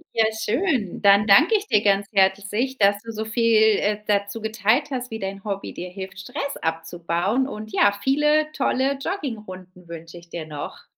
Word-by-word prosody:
Ja, 225 -1 +4
schön. 230 - -1
Dann 200 0 +5
danke 300 - +6
ich 410 +1 -7
dir 210 - +3
ganz 200 -1 +2
herzlich, 205 +6 +1
dass 205 0 +3
du 225 0 -8
so 220 +1 -3
viel, 220 -1 +3
äh, 210 0 -1
dazu 205 +1 -1
geteilt 220 +6 +1
hast, 250 -1 -4
wie 220 0 -6
dein 195 0 -5
Hobby 200 -1 -4
dir 180 +1 -7
hilft, 190 0 -9
Stress 280 +9 -5
abzubauen 170 +8 -1
und 215 -4 -8
ja, 200 +1 +3
viele 300 +3 +2
tolle 270 -1 0
Joggingrunden 190 - -6
wünsche 165 0 -10
ich 170 0 -14
dir 165 -2 -6
noch. 150 -2 -8
210 Hz, 175 wpm, -23 LUFS, 190-250 Hz, -, danke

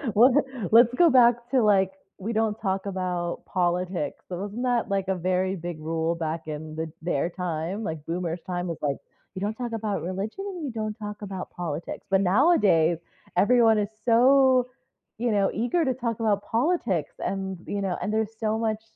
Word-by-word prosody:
Let's 250 +5 +6 0.3
let's 235 +2 +7
go 345 +2 +6
back 245 -2 +6 0.2
to, 260 - +4
like, 195 -3 +4 0.3
we 215 +5 -4
don't 220 -1 +1
talk 190 -1 -1
about 180 -3 -3
politics, 180 -3 -1
so 180 - -4
wasn't 205 +5 -4
that, 245 -4 +1
like, 195 -1 0
a 190 - +2
very 185 +2 0
big 170 -2 -6
rule 165 +1 -1
back 160 -1 -4
in 155 0 -6
the 160 0 -4
their 170 -1 0
time? 180 +3 -3
Like, 160 -6 -5
boomers 170 0 -3
time 180 -1 -2
was, 165 - -4
like, 140 -2 0 0.4
"You 185 - -5
don't 210 +2 -1
talk 240 0 -4
about 215 -2 -2
religion, 200 - -4
and 360 -6 -5
you 260 - -3
don't 215 -1 -3
talk 210 0 -6
about 190 -2 -6
politics," 170 -2 -5
but 195 0 +3
nowadays, 190 - +4 0.4
everyone 225 +2 +5
is 205 - -1 0.2
so, 255 +1 +5 0.5
you 235 0 0
know, 200 -2 +2
eager 245 - +1
to 260 - +1
talk 235 -3 -3
about 205 -2 +1
politics 225 - 0
and, 190 -1 -3
you 200 0 -2
know, 190 -2 -1
and 210 - -2
there's 220 0 -1
so 220 0 0
much 220 -1 -1
195 Hz, 185 wpm, -26 LUFS, 175-230 Hz, 0.5 s, let's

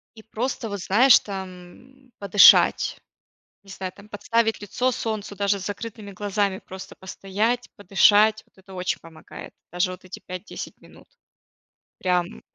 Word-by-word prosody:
и 220 - -13
просто, 235 +2 -4
вот, 200 -2 -5
знаешь, 235 +7 +6
там 195 +7 -10
подышать. 200 0 +5 0.6
Не 195 - -17
знаю, 190 -1 -6
там 200 +1 -16
подставить 225 +2 0
лицо 245 +5 -1
солнцу, 215 -4 -4
даже 200 0 0
с 190 - -7
закрытыми 205 0 -7
глазами 200 0 -1
просто 190 0 -10
постоять, 210 +6 -2
подышать. 205 +2 +4
Вот - - -32
это 190 0 -15
очень 180 0 -2
помогает. 160 -1 -12 0.2
Даже 180 +1 -1
вот 185 - -12
эти 185 0 -10
5-10 185 +2 -8
минут. - - -18 0.9
Прям 180 -1 -1
200 Hz, 140 wpm, -24 LUFS, 190-220 Hz, 0.9 s, знаешь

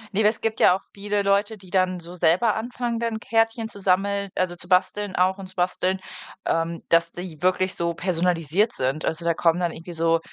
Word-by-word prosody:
Ne, 215 - +3
es 215 - 0
gibt 225 -1 -1
ja 180 - +6
auch 190 - -7
viele 205 0 -1
Leute, 200 +2 +1
die 185 -2 -16
dann 185 -1 +1
so 170 +1 -9
selber 180 +6 +3
anfangen, 235 +1 -3
dann 230 -1 -1
Kärtchen 225 0 +1
zu 200 - -7
sammeln 200 +1 +1
also, 185 -1 0
zu 175 +1 -6
basteln 185 +2 +1
auch 185 +2 +2
und 190 - -7
zu 185 - -10
basteln, 185 +1 0 0.5
ähm, 165 0 -1
dass 170 0 +3
die 175 -4 -8
wirklich 185 +1 +2
so 170 -1 -2
personalisiert 180 - +1
sind. 135 +4 -1
Also, 165 +1 -2
da 170 - +3
kommen 165 +1 +2
dann 175 -2 0
irgendwie 170 +2 -9
so 165 0 +2
185 Hz, 210 wpm, -24 LUFS, 170-205 Hz, 0.5 s, ja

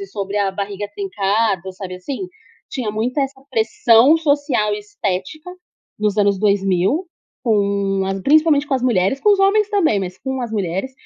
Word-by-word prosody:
e 200 - -6
sobre 200 +1 -5
a 200 -1 +1
barriga 200 +1 -4
trincada, 195 -1 -1
sabe 185 -1 -7
assim? 270 - -5 0.4
Tinha 245 -6 -3
muita 235 +6 -2
essa 270 0 -5
pressão 230 +4 +4
social 285 -9 +1
e - - -4
estética 210 - -5 0.5
nos 210 -1 0
anos 200 -2 +2
2000, 200 - +1 0.4
com 200 -4 +1
a 195 - -1
principalmente 300 0 +4
com 280 - 0
as 255 - -1
mulheres, 235 +1 +1
com 420 - +4
os 400 - +2
homens 400 +2 +3
também, 335 - +2
mas 185 -1 -6
com 265 -1 -4
as 235 - -4
mulheres. 195 +4 -2
210 Hz, 170 wpm, -19 LUFS, 195-275 Hz, 0.5 s, pressão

